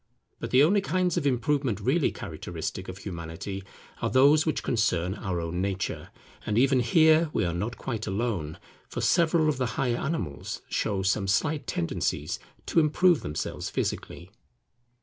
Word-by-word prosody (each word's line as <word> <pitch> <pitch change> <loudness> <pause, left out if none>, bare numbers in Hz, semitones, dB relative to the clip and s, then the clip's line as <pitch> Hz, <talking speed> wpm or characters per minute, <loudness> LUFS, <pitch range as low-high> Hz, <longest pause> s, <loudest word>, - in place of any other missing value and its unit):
But - - -4
the 130 +2 +6
only 200 +6 +4
kinds 185 -3 0
of 160 -5 +1
improvement 130 -3 0
really 135 +9 +2
characteristic 90 +2 -6
of 95 - -7
Humanity 90 +1 -6 0.4
are - - 0
those 145 +4 +5
which 155 - 0
concern 95 -6 +1
our 95 -4 -3
own 85 +2 -3
nature; 95 -1 -3 0.3
and 105 - -1
even 135 +1 +4
here 155 +6 +4
we - - +1
are 85 - -1
not 105 +7 -3
quite 115 -4 -4
alone; 95 -7 -2 0.3
for - - -5
several 170 -2 +3
of 150 - +1
the 130 -2 0
higher 120 -3 +1
animals 85 - -4
show 100 -3 -1
some 95 +1 +1
slight 145 +8 0
tendencies 80 -1 -2 0.3
to - - +2
improve 165 +2 +4
themselves 75 +1 -4
physically. 90 +2 -4
115 Hz, 155 wpm, -27 LUFS, 95-150 Hz, 0.4 s, the